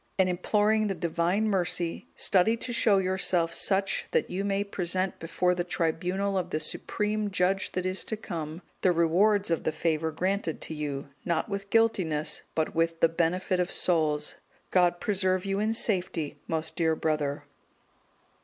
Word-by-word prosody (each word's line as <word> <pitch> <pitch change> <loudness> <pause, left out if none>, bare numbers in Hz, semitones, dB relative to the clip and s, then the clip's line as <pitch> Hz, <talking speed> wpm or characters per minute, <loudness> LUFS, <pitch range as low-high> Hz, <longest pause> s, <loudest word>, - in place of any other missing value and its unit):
And 190 -1 +4
imploring 210 +4 +2
the 195 - -2
Divine 175 +5 0
mercy, 175 -4 -1
study 200 +5 +3
to 240 +1 -4
show 215 -3 +4
yourself 185 -3 +1
such 195 +2 0
that - - 0
you 190 +2 -2
may 200 0 0
present 185 -1 -2
before 180 +2 +1
the 175 -1 -1
tribunal 180 +3 -1
of 180 - -4
the 155 - -1
Supreme 210 +6 -1
Judge 190 +1 0
that 185 0 -2
is 185 +1 0
to 220 - -2
come, 165 -4 -6 0.2
the 185 - +4
rewards 180 +4 +3
of 165 - 0
the - - 0
favour 160 0 -1
granted 185 +1 -1
to - - -4
you, 145 -2 -4
not 170 +1 -1
with 200 -1 -4
guiltiness, 185 -10 +1
but 160 -1 0
with 165 0 0
the 165 - +5
benefit 180 +2 0
of 180 0 0
souls. 155 -4 +1 0.4
"God 175 -1 +3
preserve 185 -2 0
you 195 0 -1
in 215 +1 +1
safety, 180 -8 0
most 160 0 -3
dear 160 -2 +2
brother!" 150 -3 -1
180 Hz, 165 wpm, -28 LUFS, 165-195 Hz, 0.4 s, the